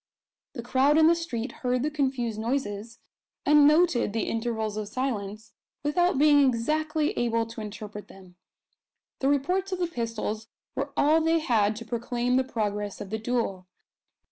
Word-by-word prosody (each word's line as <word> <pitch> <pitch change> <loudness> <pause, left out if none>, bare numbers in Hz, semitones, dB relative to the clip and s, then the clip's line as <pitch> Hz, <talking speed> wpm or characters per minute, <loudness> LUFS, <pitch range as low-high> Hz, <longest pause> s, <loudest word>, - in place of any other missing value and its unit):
The 235 - -6
crowd 265 +5 +3
in 315 - +6
the 330 - +6
street 275 -8 -4
heard 250 0 0
the 305 - -1
confused 260 -7 -1
noises, 230 -2 -3 0.5
and 295 0 +6
noted 305 - +3
the 225 -2 0
intervals 225 -2 -2
of 215 -1 -4
silence, 215 -3 -4 0.3
without 350 +3 +2
being 290 0 +6
exactly 305 +5 +1
able 230 -1 0
to 230 0 -8
interpret 210 0 -8
them. 185 -2 -16 0.8
The 270 - +1
reports 360 +8 0
of 370 - -1
the 355 - 0
pistols 230 -6 -4 0.3
were - - -3
all 310 +3 +4
they 325 +1 +3
had 220 -9 +1
to 230 +2 -8
proclaim 240 +1 -1
the 260 - +3
progress 210 -5 -3
of 200 - -8
the 220 - -2
duel. 220 -6 -2
240 Hz, 160 wpm, -27 LUFS, 220-295 Hz, 0.8 s, in